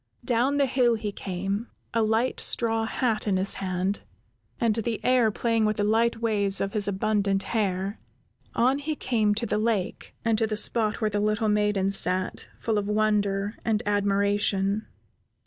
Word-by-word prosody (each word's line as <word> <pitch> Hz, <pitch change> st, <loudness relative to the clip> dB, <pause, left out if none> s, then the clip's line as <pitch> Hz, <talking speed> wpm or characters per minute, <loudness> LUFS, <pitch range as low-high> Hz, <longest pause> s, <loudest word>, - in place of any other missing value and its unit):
Down 250 Hz, +4 st, +2 dB
the 280 Hz, -, +4 dB
hill 250 Hz, -2 st, +2 dB
he 215 Hz, -2 st, -4 dB
came, 195 Hz, +4 st, -4 dB, 0.3 s
a 230 Hz, -, +2 dB
light 225 Hz, +3 st, +1 dB
straw 225 Hz, -1 st, +2 dB
hat 225 Hz, -2 st, -1 dB
in 195 Hz, -2 st, +2 dB
his 190 Hz, +1 st, +1 dB
hand, 185 Hz, +1 st, -1 dB, 0.6 s
and 230 Hz, -4 st, +2 dB
the 225 Hz, 0 st, -2 dB
air 250 Hz, -3 st, +4 dB
playing 230 Hz, +1 st, 0 dB
with 215 Hz, 0 st, +1 dB
the 205 Hz, -, +1 dB
light 225 Hz, +2 st, +2 dB
waves 205 Hz, -4 st, 0 dB
of 195 Hz, 0 st, -2 dB
his 205 Hz, -2 st, 0 dB
abundant 200 Hz, -1 st, 0 dB
hair. 200 Hz, -2 st, -1 dB, 0.6 s
On 260 Hz, +4 st, +3 dB
he 305 Hz, +2 st, -3 dB
came 220 Hz, -6 st, +1 dB
to 230 Hz, +2 st, -1 dB
the 210 Hz, -1 st, 0 dB
lake, 215 Hz, -4 st, -2 dB
and 225 Hz, -1 st, +2 dB
to 225 Hz, -, +2 dB
the 215 Hz, -1 st, -3 dB
spot 215 Hz, 0 st, +2 dB
where 215 Hz, -1 st, +1 dB
the 205 Hz, -, 0 dB
little 215 Hz, +1 st, +1 dB
maiden 210 Hz, -2 st, +1 dB
sat, 185 Hz, -1 st, -1 dB
full 220 Hz, -2 st, 0 dB
of 200 Hz, -, -4 dB
wonder 210 Hz, -1 st, 0 dB
and 220 Hz, -1 st, 0 dB
admiration. 200 Hz, 0 st, +1 dB
215 Hz, 170 wpm, -26 LUFS, 200-230 Hz, 0.6 s, the